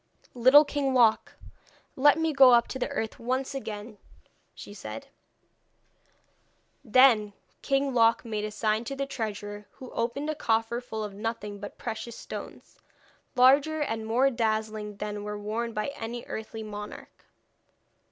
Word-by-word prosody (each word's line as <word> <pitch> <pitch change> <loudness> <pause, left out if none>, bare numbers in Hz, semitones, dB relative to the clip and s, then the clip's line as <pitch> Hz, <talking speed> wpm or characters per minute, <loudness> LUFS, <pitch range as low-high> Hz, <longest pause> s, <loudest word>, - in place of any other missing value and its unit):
'Little 260 +5 +7
King 280 -2 -1
Loc, 230 -3 +3 0.6
let 290 +3 +5
me 320 -1 0
go 265 -3 +8
up 235 - +3
to 260 - -5
the - - -1
earth 220 0 -4
once 255 +3 -2
again,' 215 -4 -7 0.6
she 205 - -10
said. 110 - -8 1.7
Then 220 -4 +5 0.3
King 275 -1 0
Loc 230 0 +3
made 215 -2 -3
a 215 - -2
sign 215 +1 0
to 275 - -4
the 275 0 -2
treasurer, 205 -5 -5
who 255 - -11
opened 275 +6 -2
a - - -2
coffer 230 -4 0
full 220 -3 -5
of 205 -1 -6
nothing 210 -1 -5
but 205 - -9
precious 230 +1 -6
stones, - - -9 0.6
larger 280 +5 +5
and 225 -6 -2
more 255 +5 +3
dazzling 215 -3 -2
than 210 0 -5
were 210 0 -5
worn 220 +3 -3
by 215 +3 -2
any 235 -2 -6
earthly 220 0 -6
monarch. 210 -1 -9
230 Hz, 145 wpm, -27 LUFS, 215-260 Hz, 1.7 s, go